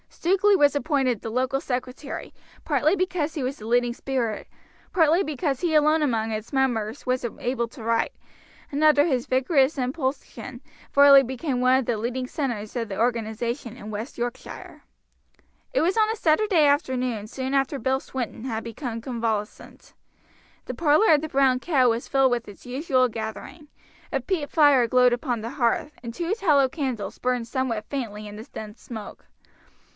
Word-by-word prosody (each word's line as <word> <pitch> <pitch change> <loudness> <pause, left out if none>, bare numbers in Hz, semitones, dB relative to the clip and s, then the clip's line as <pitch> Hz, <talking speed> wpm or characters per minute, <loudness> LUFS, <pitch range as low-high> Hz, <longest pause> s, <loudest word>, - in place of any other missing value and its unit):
Stukeley 390 +4 +2
was 290 -3 +4
appointed 275 -6 0
the 225 - -5
local 260 +3 0
secretary, 255 +2 -5 0.3
partly 300 +3 +2
because 360 -4 -1
he 290 - -2
was 260 +2 -3
the 215 - -10
leading 240 0 +2
spirit, 240 -4 -3 0.5
partly 330 +2 +4
because 285 -3 -2
he 340 -3 0
alone 305 +1 +4
among 225 -6 0
its 215 +4 -5
members 240 -5 0
was 255 -1 0
able 240 -1 -1
to 230 0 -12
write, 230 0 0 0.6
and 290 +2 -1
under 300 -1 +6
his 260 -7 0
vigorous 265 +2 +2
impulsion 260 +1 -4 0.3
Varley 280 -1 +8
became 260 +1 -3
one 255 +1 +5
of 265 - -1
the 230 - 0
leading 250 +3 -3
centers 240 -7 -4
of 230 -3 -2
the 195 - -5
organization 235 +1 -2
in 210 - -9
West 215 +5 -6
Yorkshire. 240 0 -6 0.9
It - - +2
was 365 +6 +1
on 435 -1 +4
a 445 - 0
Saturday 325 -4 +3
evening 255 -7 -1
soon 260 +3 -4
after 275 0 +1
Bill 265 0 +1
Swinton 255 -3 -5
had 225 -3 -3
become 230 0 -5
convalescent. 225 -4 -4 0.7
The - - -5
parlor 320 +4 +4
of 295 - +3
the 315 - -5
"Brown 265 -2 +3
Cow" 265 -5 +3
was 230 +1 -1
filled 270 -1 +3
with 240 -1 -1
its 205 - -13
usual 255 0 +1
gathering; 220 - -7 0.4
a - - 0
peat 330 -7 -2
fire 285 -6 +5
glowed 250 +1 +4
upon 240 -2 -2
the 230 +2 -5
hearth, 275 +2 0
and 235 -1 -6
two 345 - -2
tallow 300 - +3
candles 255 -9 -4
burned 250 -2 -1
somewhat 235 -4 -2
faintly 215 -6 -4
in 205 - -9
the 215 - -8
dense 215 -2 -10
smoke. 220 -4 -9
260 Hz, 170 wpm, -25 LUFS, 235-290 Hz, 0.9 s, Varley